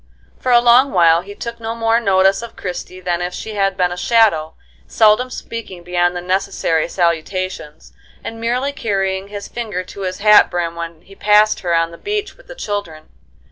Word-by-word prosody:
For 255 - -1
a 240 - +7
long 245 +3 +5
while 170 -2 +4
he 200 +3 -11
took 235 +2 -7
no 225 0 -4
more 230 0 +2
notice 195 -2 +3
of 235 - -9
Christie 180 0 -6
than 175 -1 -1
if 180 0 -3
she 220 - -6
had 195 -2 0
been 180 -1 +1
a - - -3
shadow, 180 -7 +2 0.3
seldom 220 +4 +3
speaking 230 -8 -8
beyond 175 0 0
the 175 - -3
necessary 185 -3 -1
salutations, 170 -2 -3 0.3
and 225 0 -7
merely 250 +4 0
carrying 195 -4 -2
his 205 0 -7
finger 215 -6 -4
to 195 - -11
his 185 -1 -3
hat 210 0 +6
brim 175 -2 -2
when 170 -1 -7
he 195 - -17
passed 210 +2 +3
her 175 -2 0
on 165 0 +1
the 170 - -12
beach 415 0 -3
with - - -21
the - - -10
children. 205 - -5
195 Hz, 190 wpm, -18 LUFS, 175-225 Hz, 0.3 s, a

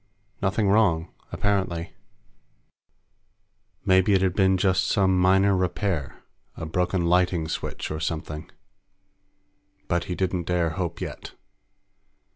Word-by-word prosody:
Nothing 100 +2 +1
wrong, 95 -6 +2 0.2
apparently. 95 -5 -1 1.9
Maybe 95 +1 +4
it 95 -1 +3
had 95 -2 +1
just - - -24
been 95 -1 +3 0.2
some 95 -2 +3
minor 95 +2 +4
repair 90 -5 -2 0.3
a - - -5
broken 90 +2 0
lighting 90 -1 +2
switch 80 - -4
or 80 - -3
something. 80 -1 -4 1.4
But 85 -1 0
he 90 - -4
didn't 90 -2 -2
dare 85 -2 +1
hope 85 0 -4
yet. - - -7
90 Hz, 110 wpm, -25 LUFS, 85-95 Hz, 1.9 s, Maybe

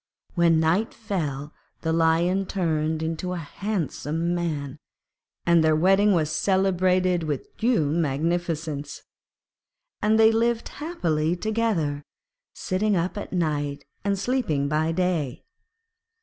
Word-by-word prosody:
When 170 -2 +4
night 170 +8 +1
fell, 150 -10 -4 0.3
the 160 -1 0
Lion 170 +4 +2
turned 160 -4 -1
into 165 +3 -3
a - - -3
handsome 170 -2 -2
man, 150 -6 -3 0.7
and 170 -1 +5
their 155 -1 +4
wedding 195 +5 +4
was 155 -3 +1
celebrated 185 -1 +2
with 150 -4 -4
due 230 -9 +2
magnificence. 160 -1 -1 1.0
And 215 +1 +3
they 220 0 +7
lived 230 +1 0
happily 170 - -1
together, 200 -8 -1 0.5
sitting 205 +3 0
up 175 +2 -1
at 205 - -6
night 145 -6 -1 0.2
and 200 0 0
sleeping 195 - 0
by 155 +2 +1
day. 165 -7 -1
170 Hz, 115 wpm, -25 LUFS, 155-195 Hz, 1.0 s, they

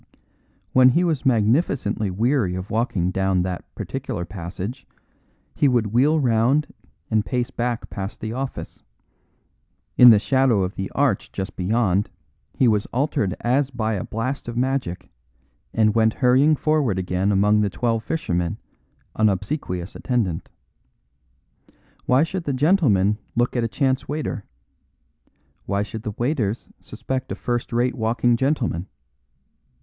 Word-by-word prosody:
When 130 0 +7
he 170 +8 +2
was 160 -7 0
magnificently 115 - +1
weary 110 0 +1
of 95 +2 -6
walking 105 -6 0
down 95 -1 +1
that 90 -1 -4
particular 85 - -4
passage 95 - -7 0.7
he 145 - +2
would 115 -5 +1
wheel 145 +6 +4
round 125 +3 +2 0.4
and 110 -1 +2
pace 125 +2 -2
back 120 -1 -2
past 100 +1 -5
the 110 +1 -4
office; 135 +2 -6 1.2
in 125 - +11
the 110 - +8
shadow 130 -2 +2
of 90 +1 -3
the 95 - -4
arch 135 -8 +1
just 95 0 -5
beyond 100 0 +1 0.5
he 130 - +3
was 105 -3 +2
altered 120 -8 -1
as 130 +3 +1
by 110 -4 -2
a 95 - -2
blast 125 +5 -4
of 120 0 -5
magic, 130 -8 -1 0.6
and 110 -1 +2
went 110 -1 +3
hurrying 135 +4 +4
forward 150 -9 +1
again 95 +2 0
among 105 +2 +3
the 105 - +1
Twelve 115 +2 -1
Fishermen, 90 - -2 0.6
an 110 0 +4
obsequious 95 - -3
attendant. 110 -10 -2 1.6
Why 130 +4 +4
should 175 +1 -4
the 140 - -1
gentlemen 125 - +3 0.2
look 120 +2 +1
at 120 - +1
a - - +1
chance 130 +2 0
waiter? 145 -7 -4 1.2
Why 100 +1 0
should 105 +2 -7
the 105 -1 -5
waiters 120 -4 -1
suspect 130 0 -5
a - - -2
first 120 -1 -3
rate 120 +2 +1
walking 120 +1 +1
gentleman? 120 - -1
115 Hz, 140 wpm, -22 LUFS, 100-130 Hz, 1.6 s, in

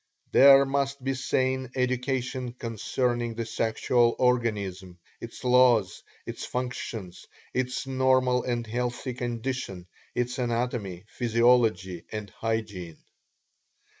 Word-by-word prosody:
There 140 0 +8
must 140 0 -1
be 135 +1 0
sane 130 0 0
education 130 -1 -1
concerning 120 0 -2
the 115 0 -3
sexual 115 +2 +1
organism, 100 -7 0 0.2
its 115 +2 -9
laws, 125 -6 +4 0.2
its - - -6
functions, 120 -7 -5 0.3
its 125 +1 -1
normal 130 -1 +2
and 120 -2 -2
healthy 125 +3 -3
condition, 120 -6 -4 0.3
its 125 +2 -1
anatomy, 115 -6 -2
physiology 115 -7 +2
and 105 -3 -6
hygiene. 105 -8 -4
120 Hz, 100 wpm, -27 LUFS, 110-130 Hz, 0.3 s, There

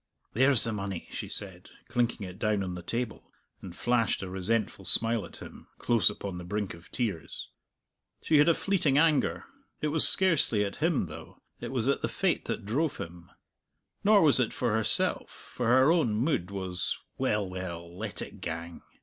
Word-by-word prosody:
"There's 130 +1 +5
the 115 - +3
money!" 100 -4 -5
she - - -6
said, 95 -3 -6 0.2
clinking 120 -3 -1
it 90 +1 -10
down 105 -2 0
on 90 -1 -4
the 90 - -7
table, 115 +5 -5 0.3
and 90 -2 -9
flashed 115 -3 0
a 95 - -6
resentful 95 +2 -1
smile 115 +1 +3
at - - -14
him, - - -13
close 115 -3 +3
upon 100 -3 -6
the - - -8
brink 100 +2 -3
of 85 +1 -15
tears. 100 - -4 0.7
She 155 - +3
had 150 - +5
a 165 - +4
fleeting 165 -8 +1
anger. 155 -2 +2 0.3
It 150 - -1
was 155 +1 +5
scarcely 155 - +3
at 100 - -6
him, 160 - +1
though; 75 - -12 0.2
it - - -6
was 125 -2 -1
at 140 - +1
the - - 0
fate - - -1
that - - -4
drove 140 +9 -1
him. 85 +1 -9 0.7
Nor 205 -2 +5
was 145 -4 +5
it 125 - 0
for 120 -4 -1
herself, 110 0 +3
for 125 - -6
her 130 +5 +5
own 155 -11 +2
mood 110 - 0
was, 95 -3 -3 0.2
"Well, 105 -2 0
well; 85 -2 -7
let - - -5
it - - -12
gang." 85 0 -6
110 Hz, 185 wpm, -28 LUFS, 95-130 Hz, 0.7 s, There's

